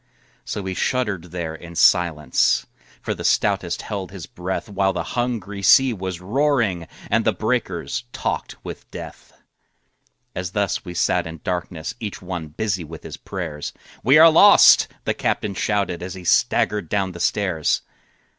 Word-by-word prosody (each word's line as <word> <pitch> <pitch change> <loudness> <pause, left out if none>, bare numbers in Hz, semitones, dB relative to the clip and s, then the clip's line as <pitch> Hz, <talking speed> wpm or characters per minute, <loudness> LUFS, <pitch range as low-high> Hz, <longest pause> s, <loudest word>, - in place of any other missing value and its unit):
So 105 - -4
we 95 0 -3
shuddered 105 -5 -1
there 85 -2 -5
in 85 +1 -11
silence, 80 -7 +3 0.4
For - - -1
the - - -7
stoutest - - +1
held 95 -3 -5
his 95 -4 -8
breath, 90 +4 -5
While 100 -1 0
the - - -2
hungry 115 -5 -2
sea 125 +7 +6
was 95 -4 -5
roaring 110 - 0 0.2
And - - +3
the - - +3
breakers - - -2
talked - - -3
with - - -8
death. - - -10 1.0
As 90 0 -5
thus 100 -1 -1
we 90 -2 -8
sat 90 0 +1
in 80 -2 -9
darkness 90 +1 -3
Each 105 -4 -5
one 90 -3 -5
busy 95 +3 -2
with 80 0 -10
his - - -8
prayers, 80 -6 -6 0.3
"We 135 +4 +6
are 165 +1 +9
lost!" 200 +6 +7 0.2
the - - +1
captain 105 -2 -1
shouted, 100 -3 -1
As 90 +1 -6
he 95 - -9
staggered 100 +1 +2
down 95 -2 0
the 85 - -10
stairs. 90 -3 0
95 Hz, 155 wpm, -22 LUFS, 85-105 Hz, 1.0 s, are